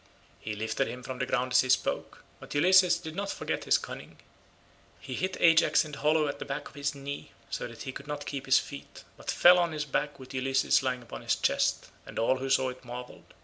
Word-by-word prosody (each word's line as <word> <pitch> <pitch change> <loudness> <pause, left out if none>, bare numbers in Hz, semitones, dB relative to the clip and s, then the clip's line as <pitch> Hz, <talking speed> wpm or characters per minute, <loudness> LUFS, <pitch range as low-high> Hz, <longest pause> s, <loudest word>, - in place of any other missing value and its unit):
He 110 - -5
lifted 110 +1 -1
him 125 +2 -7
from 130 +1 -6
the 130 - -1
ground 130 0 0
as - - +6
he 130 - -4
spoke, 125 - 0 0.2
but - - -9
Ulysses 185 +4 +5
did 160 0 -8
not 200 +1 -3
forget - - -3
his - - +4
cunning. - - -9 0.8
He - - -7
hit 185 0 -2
Ajax 165 -1 +5
in 155 - -9
the 140 - -8
hollow 155 0 +3
at 145 - -5
back 145 +1 -4
of - - -15
his 140 0 -2
knee, 140 +1 -7 0.2
so - - -3
that - - -10
he 130 - -5
could 140 +2 -10
not 145 -1 -5
keep 135 -2 -5
his 130 - +6
feet, 140 - -6
but - - -10
fell 180 +1 +7
on 170 -2 +1
his 150 -1 -2
back 145 +1 -2
with 130 0 -11
Ulysses 135 +1 +2
lying 130 -1 -2
upon 115 - -9
his - - +1
chest, - - 0 0.2
and - - -9
all 130 +3 +2
who 135 +1 -4
saw 130 -1 +3
it 125 +1 -10
marvelled. 125 0 -10
140 Hz, 230 wpm, -29 LUFS, 130-150 Hz, 0.8 s, fell